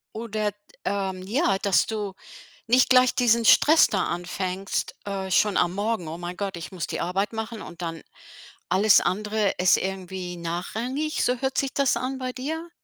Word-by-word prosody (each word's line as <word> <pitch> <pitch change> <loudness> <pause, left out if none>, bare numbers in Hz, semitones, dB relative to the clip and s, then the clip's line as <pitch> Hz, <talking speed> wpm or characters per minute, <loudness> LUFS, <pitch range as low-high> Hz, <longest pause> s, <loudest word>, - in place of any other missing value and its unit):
Oder, 215 -2 -2 0.3
ähm, 190 -2 -2
ja, 205 - +1
dass 195 -2 +3
du 210 -3 -4 0.5
nicht 250 +2 +4
gleich 255 -1 +5
diesen 235 -2 +3
Stress 315 +8 +6
da 190 -3 0
anfängst, 180 +2 -3
äh, 195 -1 -4
schon 205 +2 +3
am 175 0 +2
Morgen. 205 -4 -2
„Oh 165 +2 -6
mein 175 +1 -6
Gott, 195 -2 -3
ich 170 - -7
muss 175 -4 -4
die - - -4
Arbeit 195 +4 -1
machen 220 0 -5
und 170 - -10
dann 165 -1 -5 0.7
alles 200 +3 +5
andere 210 +1 0
ist 180 -1 +5
irgendwie 185 -1 -5
nachrangig,” 225 - -3
so 250 - +1
hört 265 -1 -1
sich 275 -1 0
das 280 -2 +2
an 260 +1 -3
bei 255 -1 -4
dir? 320 +7 -5
205 Hz, 175 wpm, -25 LUFS, 185-240 Hz, 0.7 s, Stress